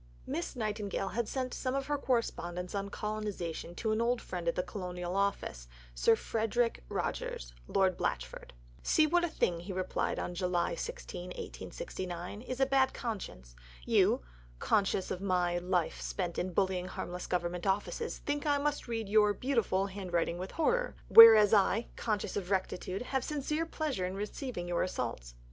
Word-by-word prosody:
Miss 170 Hz, -, -3 dB
Nightingale 210 Hz, -4 st, -2 dB
had 235 Hz, 0 st, -1 dB
sent 255 Hz, -2 st, -2 dB
some 255 Hz, 0 st, -2 dB
of 275 Hz, 0 st, -1 dB
her 290 Hz, 0 st, -1 dB
correspondence 180 Hz, -9 st, -1 dB
on 200 Hz, 0 st, -2 dB
colonization 205 Hz, -6 st, -4 dB
to 220 Hz, +3 st, -1 dB
an 215 Hz, +1 st, +1 dB
old 240 Hz, +1 st, +2 dB
friend 175 Hz, -5 st, -5 dB
at 170 Hz, -, +2 dB
the 180 Hz, -, 0 dB
Colonial 180 Hz, -1 st, -5 dB
Office 195 Hz, -, -1 dB, 0.3 s
Sir -, -, +4 dB
Frederick 225 Hz, +2 st, 0 dB
Rogers -, -, -3 dB
(Lord 190 Hz, -2 st, +2 dB
Blachford). -, -, -3 dB, 0.3 s
"See 315 Hz, -, +4 dB
what 350 Hz, +3 st, +3 dB
a -, -, +3 dB
thing," 175 Hz, -, 0 dB
he 175 Hz, +4 st, -7 dB
replied 185 Hz, 0 st, -1 dB, 0.2 s
(July 180 Hz, -1 st, 0 dB
26, -, -, -5 dB
1869), 180 Hz, -, -6 dB
"is 255 Hz, +1 st, -5 dB
a 270 Hz, -, +5 dB
bad 265 Hz, -1 st, +2 dB
conscience! 120 Hz, -, -5 dB, 0.3 s
You, -, -, +4 dB, 0.4 s
conscious 195 Hz, -, +1 dB
of 185 Hz, -, -3 dB
a 180 Hz, -2 st, +1 dB
life 180 Hz, -2 st, 0 dB
spent 175 Hz, -3 st, -3 dB
in 185 Hz, -, -2 dB
bullying 185 Hz, 0 st, 0 dB
harmless 180 Hz, -1 st, -5 dB
Government 175 Hz, 0 st, -1 dB
offices, 205 Hz, -, -1 dB
think 290 Hz, +1 st, -1 dB
that 290 Hz, -1 st, +3 dB
I -, -, +2 dB
must 295 Hz, -2 st, -1 dB
read 225 Hz, -2 st, -2 dB
your 210 Hz, 0 st, +4 dB
(beautiful) 230 Hz, -7 st, +1 dB
handwriting 180 Hz, -3 st, -2 dB
with 185 Hz, +1 st, -4 dB
horror. 485 Hz, +10 st, +1 dB
Whereas 225 Hz, -2 st, +10 dB
I, 215 Hz, +2 st, +3 dB
conscious 215 Hz, -3 st, -2 dB
of 190 Hz, -3 st, -3 dB
rectitude, 190 Hz, +1 st, -1 dB
have 265 Hz, 0 st, -1 dB
sincere 300 Hz, +2 st, -1 dB
pleasure 290 Hz, -, -2 dB
in 185 Hz, -, -5 dB
receiving 210 Hz, -1 st, -4 dB
your 175 Hz, -1 st, 0 dB
assaults." -, -, -3 dB
200 Hz, 160 wpm, -32 LUFS, 180-240 Hz, 0.4 s, Whereas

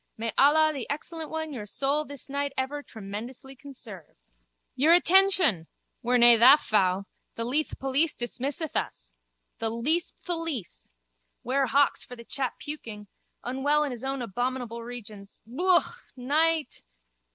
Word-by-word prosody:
May 225 Hz, 0 st, -3 dB
Allah 310 Hz, +2 st, +5 dB
the 270 Hz, -5 st, -6 dB
Excellent 315 Hz, +2 st, -5 dB
One 315 Hz, -1 st, -4 dB
your 210 Hz, -5 st, -7 dB
soul 280 Hz, +7 st, 0 dB
this 285 Hz, -2 st, -7 dB
night 280 Hz, 0 st, -3 dB
ever 275 Hz, +3 st, -2 dB
tremendously 235 Hz, +4 st, -9 dB
conserve. 240 Hz, -, -11 dB, 0.6 s
Your 305 Hz, +6 st, +4 dB
attention! 360 Hz, -, +4 dB, 0.3 s
We're 250 Hz, 0 st, +2 dB
nae 240 Hz, -1 st, +8 dB
tha 255 Hz, +6 st, +8 dB
fou. 195 Hz, -6 st, +1 dB, 0.3 s
The 230 Hz, -, -3 dB
Leith 290 Hz, +6 st, -1 dB
police 275 Hz, +4 st, 0 dB
dismisseth 270 Hz, +6 st, -4 dB
us. -, -, -3 dB, 0.5 s
The 225 Hz, -, -1 dB
least 290 Hz, +10 st, -1 dB
tholice. 330 Hz, -, -3 dB, 0.5 s
Ware 265 Hz, +2 st, +1 dB
hawks 280 Hz, +3 st, +2 dB
for 250 Hz, -, -10 dB
the 235 Hz, -1 st, -13 dB
chap 265 Hz, 0 st, -3 dB
puking. 220 Hz, -9 st, -7 dB, 0.3 s
Unwell 280 Hz, +4 st, +1 dB
in 290 Hz, -, -3 dB
his 240 Hz, -2 st, -7 dB
abominable 245 Hz, -2 st, -3 dB
regions. 215 Hz, -4 st, -10 dB
Yooka. 350 Hz, +9 st, +1 dB
Night. 305 Hz, +3 st, 0 dB
265 Hz, 135 wpm, -27 LUFS, 230-300 Hz, 0.6 s, nae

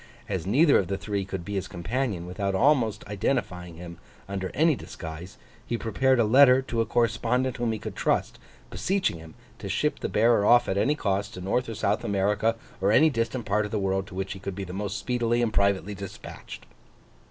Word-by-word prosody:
As 95 Hz, -3 st, -3 dB
neither 145 Hz, -, +5 dB
of 95 Hz, -, -1 dB
the 95 Hz, -, -2 dB
three 100 Hz, -1 st, -3 dB
could 95 Hz, -2 st, -6 dB
be 105 Hz, -, -5 dB
his 95 Hz, -2 st, -2 dB
companion 100 Hz, +1 st, -3 dB
without 95 Hz, +2 st, -2 dB
almost 120 Hz, -1 st, +2 dB
identifying 90 Hz, -5 st, -2 dB
him 85 Hz, 0 st, -10 dB, 0.3 s
under 95 Hz, -1 st, -3 dB
any 160 Hz, +3 st, +4 dB
disguise, 85 Hz, -, -8 dB, 0.3 s
he 120 Hz, -, -3 dB
prepared 130 Hz, +4 st, +1 dB
a -, -, +5 dB
letter 125 Hz, +3 st, +6 dB
to 120 Hz, -3 st, -1 dB
a 115 Hz, -, -1 dB
correspondent 120 Hz, +3 st, 0 dB
whom 120 Hz, -2 st, 0 dB
he 110 Hz, -, -2 dB
could -, -, -7 dB
trust, -, -, 0 dB, 0.3 s
beseeching 190 Hz, -, -1 dB
him 80 Hz, -1 st, -13 dB, 0.2 s
to -, -, -6 dB
ship -, -, 0 dB
the -, -, -3 dB
bearer 115 Hz, -2 st, +3 dB
off 120 Hz, +3 st, +5 dB
at 95 Hz, -, 0 dB
any 140 Hz, +9 st, +2 dB
cost, 100 Hz, -5 st, -2 dB
to 90 Hz, -, -7 dB
North 115 Hz, +7 st, -1 dB
or 115 Hz, -, -5 dB
South 105 Hz, 0 st, 0 dB
America, 105 Hz, +3 st, +1 dB, 0.3 s
or 100 Hz, +2 st, +3 dB
any 155 Hz, +7 st, +5 dB
distant 115 Hz, 0 st, -2 dB
part 105 Hz, +1 st, +1 dB
of 105 Hz, -, -4 dB
the 110 Hz, -, -2 dB
world 95 Hz, -1 st, -1 dB
to 90 Hz, -, -11 dB
which 95 Hz, 0 st, -3 dB
he 95 Hz, -, -10 dB
could 100 Hz, -1 st, -5 dB
be 100 Hz, -, -4 dB
the 90 Hz, -1 st, -7 dB
most 100 Hz, +1 st, -3 dB
speedily 120 Hz, -1 st, 0 dB
and 115 Hz, -2 st, 0 dB
privately 100 Hz, 0 st, +1 dB
dispatched. 100 Hz, -1 st, -9 dB
105 Hz, 210 wpm, -26 LUFS, 95-120 Hz, 0.3 s, letter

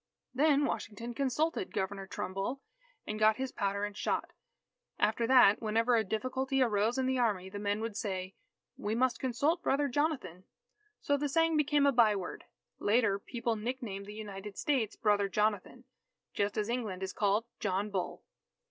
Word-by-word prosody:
Then 290 Hz, +1 st, +3 dB
Washington 230 Hz, 0 st, -4 dB
consulted 305 Hz, -, -1 dB
Governor 195 Hz, 0 st, -3 dB
Trumbull, 195 Hz, +9 st, -3 dB, 0.5 s
and 215 Hz, 0 st, -4 dB
got 215 Hz, 0 st, +5 dB
his 260 Hz, +1 st, -3 dB
powder 200 Hz, 0 st, -1 dB
and 205 Hz, -1 st, -7 dB
shot. -, -, -1 dB, 0.7 s
After 230 Hz, +2 st, +1 dB
that, 245 Hz, -5 st, +6 dB
whenever 230 Hz, +2 st, +2 dB
a 225 Hz, -, +3 dB
difficulty 255 Hz, +6 st, -1 dB
arose 225 Hz, -1 st, +2 dB
in 260 Hz, -, +1 dB
the 260 Hz, 0 st, +1 dB
Army, 200 Hz, -6 st, 0 dB
the 205 Hz, +1 st, -6 dB
men 205 Hz, +1 st, -1 dB
would 225 Hz, -2 st, -4 dB
say, 190 Hz, -3 st, -3 dB, 0.4 s
"We 210 Hz, +2 st, -2 dB
must 245 Hz, 0 st, +1 dB
consult 285 Hz, +7 st, +1 dB
Brother 285 Hz, -1 st, +1 dB
Jonathan." 255 Hz, -, -2 dB, 0.6 s
So 285 Hz, -, +1 dB
the 290 Hz, 0 st, -1 dB
saying 325 Hz, +2 st, +3 dB
became 295 Hz, -1 st, +3 dB
a 280 Hz, -, +5 dB
byword. 215 Hz, -7 st, +1 dB, 0.3 s
Later, 205 Hz, -2 st, +2 dB
people 235 Hz, +1 st, -2 dB
nicknamed 215 Hz, -3 st, -4 dB
the 210 Hz, -, -8 dB
United 205 Hz, -1 st, -7 dB
States, 250 Hz, -7 st, 0 dB
"Brother 205 Hz, -2 st, +2 dB
Jonathan," 210 Hz, +4 st, -1 dB, 0.5 s
just 200 Hz, 0 st, -1 dB
as 210 Hz, -1 st, 0 dB
England 220 Hz, -6 st, -3 dB
is 190 Hz, -, -4 dB
called 210 Hz, +2 st, +1 dB
"John 200 Hz, +1 st, -1 dB
Bull." 190 Hz, -2 st, -3 dB
220 Hz, 160 wpm, -32 LUFS, 205-260 Hz, 0.7 s, that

